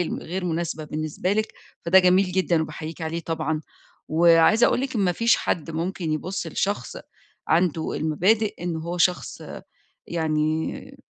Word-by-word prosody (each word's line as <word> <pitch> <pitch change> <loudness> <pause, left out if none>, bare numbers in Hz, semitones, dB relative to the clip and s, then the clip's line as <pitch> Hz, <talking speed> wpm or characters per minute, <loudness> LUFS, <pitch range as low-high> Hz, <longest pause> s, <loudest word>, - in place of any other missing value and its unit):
ال 175 - 0 0.2
الغير 180 +3 -4
مناسبة 165 -2 -2
بالنسبة 155 +4 -2
لك، 215 +1 -1 0.3
فده 180 +3 +6
جميل 185 0 +4
جدًا 180 -3 +2
وباحييكٍ 155 +2 -7
عليه 160 +1 -3
طبعًا 160 -2 -2 0.5
وعايزة 165 +7 +5
أقول - - +1
لِك 265 0 -3
إن - - +1
ما 185 -2 +2
فيش 230 +5 +3
حد 165 -1 -2
ممكن 165 0 -3
يبُص 175 +4 -3
لشخص 165 -3 -2 0.5
عنده 165 -1 +1
المبادئ، 195 +8 +1
إن 175 -2 -2
هو 170 +2 -4
شخص 180 +1 0 0.7
يعني 155 -1 -2
170 Hz, 145 wpm, -24 LUFS, 160-185 Hz, 0.7 s, فده